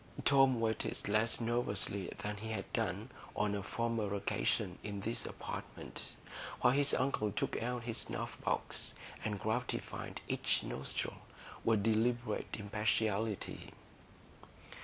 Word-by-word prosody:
Tom 135 -3 +6
waited 110 -1 0
less 110 +2 +3
nervously 115 -5 0
than 105 0 -3
he 110 +2 -5
had 110 -3 -3
done - - 0 0.2
on 105 -1 +2
a 100 - 0
former 110 -1 0
occasion 100 - +1
in 100 -1 -3
this 115 +3 0
apartment, - - -6 0.4
while 125 - +6
his 140 0 +5
uncle 130 -6 +2
took 100 - 0
out 120 +1 -1
his 115 -1 -1
snuff - - -2
box - - -1 0.3
and 105 -2 -1
gratified 110 +4 -2
each - - +2
nostril 65 - -2 0.5
with 110 -3 +4
deliberate 115 +1 +2
impartiality. 105 0 0
110 Hz, 120 wpm, -36 LUFS, 105-120 Hz, 0.5 s, Tom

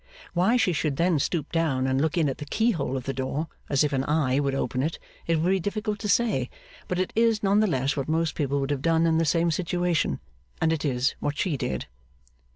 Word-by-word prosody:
Why 190 +8 +3
she 220 -7 +2
should 150 -2 -1
then 170 -2 +2
stoop 155 +1 -1
down 155 -6 +1
and 130 +1 +1
look 160 +3 0
in 160 -3 +3
at 135 - -3
the 150 - -5
keyhole 165 - 0
of 130 - -5
the 135 - -3
door 135 +4 -3 0.2
as 140 +1 +3
if 145 -1 0
an 135 -1 +1
eye 145 -3 +1
would 140 -1 0
open 130 -1 -1
it, 155 +4 -1 0.3
it 165 -1 +2
would 175 +4 +2
be 195 - +2
difficult 210 +3 -2
to 210 - -3
say; 235 +2 +2 0.4
but 180 - -2
it 185 0 -1
is 225 -1 +2
none 200 +1 +4
the 215 - +3
less 135 -5 0
what 140 0 -3
most 165 0 +1
people 140 -1 -1
would 135 +1 -2
have 140 -2 -1
done 165 +1 +3
in 165 -1 +3
the 165 - +2
same 165 +2 +2
situation, 175 - 0 0.4
and 160 0 +2
it 160 - -3
is 130 -2 +1
what 145 0 -2
she 170 -6 0
did. 65 - -3
160 Hz, 240 wpm, -26 LUFS, 140-180 Hz, 0.4 s, none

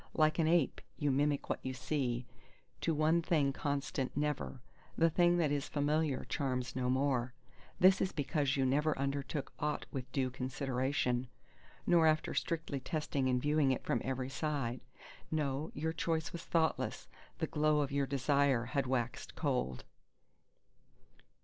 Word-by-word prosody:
Like 155 +1 +3
an 160 - +3
ape, 165 -4 +2 0.2
you 145 -2 +1
mimic 145 +1 +1
what - - -1
you 130 0 -3
see, 130 -2 -1 0.5
to 165 - 0
one 160 +2 +3
thing 150 -5 +2
constant 140 -2 -2
never; 150 -3 -1 0.4
the 165 0 +4
thing 175 +1 +4
that 160 -4 +2
is 145 -1 -1
familiar 150 -1 0
charms 130 -3 -2
no 125 -1 0
more. 130 -1 +1 0.4
This 185 +1 +6
is 190 - +1
because 145 -2 0
you 135 - +2
never 150 +4 +2
undertook 140 +1 -2
aught 150 0 -1
with 130 -1 -5
due 130 -2 0
consideration, 130 0 -1 0.6
nor 170 -2 +5
after 155 0 +2
strictly 160 -4 -2
testing 140 -2 -1
and 125 0 +2
viewing 145 0 +2
it 130 - -1
from 120 - 0
every 130 0 -2
side; 135 -5 -2 0.5
no, 150 -1 -1
your 160 +2 -1
choice 160 -1 -1
was 170 - -6
thoughtless; 160 -1 0 0.3
the - - 0
glow 150 0 +2
of 140 - -1
your 140 -1 +1
desire 140 -2 +2
had 140 -2 +1
waxed 125 -2 -2
cold 65 +1 -1
140 Hz, 150 wpm, -34 LUFS, 130-155 Hz, 0.6 s, This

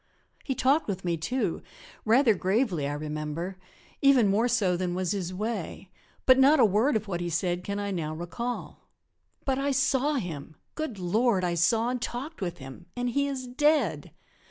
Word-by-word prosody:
He 265 - -2
talked 280 +6 +2
with 190 -2 -4
me, 170 -1 +1
too, 245 +11 -2 0.4
rather 230 +1 +5
gravely, 190 - 0
I 145 - -2
remember, 155 +5 -4 0.4
even 265 -7 +5
more 215 +5 +2
so 210 -7 +2
than 175 0 -2
was 185 -2 -1
his 185 -3 -2
way, 195 -2 -4 0.3
but 260 0 +6
not 280 +3 +6
a 240 - +7
word 220 +7 +2
of 215 -1 -1
what 175 -3 -3
he 175 - -2
said 175 +2 -1
can 200 +2 -3
I 205 0 -2
now 155 -4 -3
recall. 175 +9 -5 0.6
But 270 -1 0
I 280 +1 0
saw 275 +2 +2
him 160 - -5 0.2
good 310 -9 -4
Lord, 195 +3 +1
I 175 -1 0
saw 220 +8 +2
and 250 -1 -2
talked 265 +6 -5
with 175 -2 -3
him 135 +6 -11
and 245 0 -1
he 280 +3 +1
is 265 -2 -4
dead! 250 - +1
205 Hz, 180 wpm, -27 LUFS, 175-255 Hz, 0.6 s, a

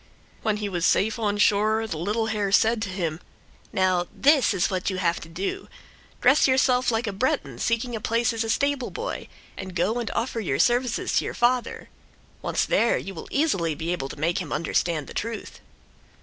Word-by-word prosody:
When 215 -2 0
he 210 -1 -3
was 175 -4 -3
safe 220 +5 +2
on 205 -2 0
shore 215 +2 +3
the 165 -8 -4
little 210 +6 0
hare 210 -3 -1
said 225 +2 +3
to 200 - -2
him: 170 -4 -3 0.5
"Now, 185 -3 +1
this 275 -6 +4
is 195 -1 0
what 185 0 -1
you 190 - -3
have 170 -2 +1
to 160 - -10
do: 185 +4 -4 0.5
dress 280 - +5
yourself 260 -1 +3
like 225 0 0
a 205 - -3
Breton 260 +9 -1
seeking 235 +1 -1
a 220 - -5
place 230 +2 +1
as 225 0 -1
stableboy, 280 - -2 0.3
and 185 -1 -7
go 195 +7 +1
and 235 - -3
offer 230 0 -1
your 170 -11 -1
services 245 - +1
to - - +2
your - - -4
father. 245 0 0 0.5
Once - - 0
there, 235 - +2
you 195 - -6
will 165 - -8
easily 195 - +1
be 165 +3 -3
able 135 -7 -3
to - - -8
make 170 +3 +1
him 175 -5 -6
understand 165 -1 0
the - - -10
truth." 230 +1 -5
215 Hz, 190 wpm, -25 LUFS, 180-235 Hz, 0.5 s, dress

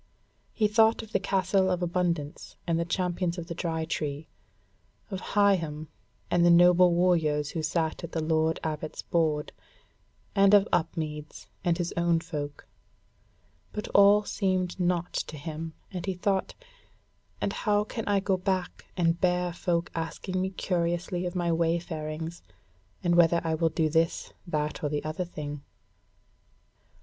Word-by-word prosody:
He 215 - +2
thought 220 +2 +4
of 220 - -12
the - - +2
Castle 190 -1 +1
of 180 -1 0
Abundance 170 -4 -2
and 165 -1 +1
the 170 - 0
Champions 180 0 -1
of 170 - -5
the 170 - -5
Dry 165 -2 -2
Tree, 150 -1 -3 0.8
of 190 -1 -4 0.2
Higham, 165 -7 +2 0.4
and 175 - +4
the 175 - +6
noble 175 +1 +6
warriors 160 -5 +2
who 165 - -3
sat 160 +1 -1
at 170 - -6
the 165 - -2
Lord 160 0 +1
Abbot's 155 -1 -4
board, 155 -3 0 0.8
and 200 0 +6
of 205 0 +5
Upmeads 155 -3 -2 0.2
and 175 -2 +2
his 175 -1 -2
own 170 -1 +2
folk: 150 -3 -6 1.1
but 210 - -5
all 200 +1 +6
seemed 185 -3 -1
naught 175 -1 0
to 155 - -3
him, 160 +1 -6 0.2
and 180 -3 -5
he 190 - -1
thought: 190 +1 -1 0.8
"And - - -1
how 210 -1 +1
can 220 +1 -6
I 200 -1 +2
go 195 -1 +1
back 185 -1 -2
and 170 -1 +1
bear 180 -1 +1
folk 175 0 -1
asking 185 +3 -3
me 190 - 0
curiously 175 -1 -1
of 175 - -6
my 175 -1 +1
wayfarings, 165 -1 -2 0.6
and 175 -1 +2
whether 170 0 +5
I 165 -1 0
will 165 +1 +2
do 160 0 +1
this, 165 +1 0
that, 150 -2 -2
or 145 - +1
the 145 0 -2
other 155 +4 -3
thing." 150 -4 -6
170 Hz, 155 wpm, -28 LUFS, 160-185 Hz, 1.1 s, the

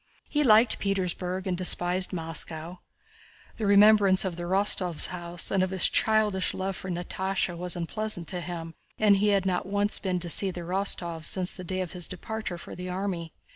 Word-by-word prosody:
He 295 0 0
liked 225 -2 +4
Petersburg 185 -1 -2
and 185 -2 -1
despised 180 0 +2
Moscow. 165 0 -4 0.8
The 215 - -2
remembrance 200 -1 +5
of 180 -3 -3
the 175 0 -6
Rostóvs' 185 -3 +2
house 175 -1 -3
and 195 - +2
of 185 - 0
his 190 -2 +4
childish 215 -4 +1
love 190 0 -3
for 190 - -7
Natásha 185 +1 -2
was 180 +1 -1
unpleasant 180 0 -3
to 180 -2 -4
him 165 -1 -7 0.2
and 205 -2 +4
he 205 +2 +1
had 200 -2 +2
not 185 -1 -1
once 205 +1 0
been 185 -2 -2
to 175 0 -2
see 195 - +2
the 180 -1 -6
Rostóvs 170 -2 0
since 185 +1 +2
the 185 - -9
day 185 +1 -3
of 180 - -5
his 180 -2 -5
departure 215 0 -6
for - - -11
the 180 +1 -7
army. 180 -3 -4
185 Hz, 185 wpm, -27 LUFS, 175-200 Hz, 0.8 s, remembrance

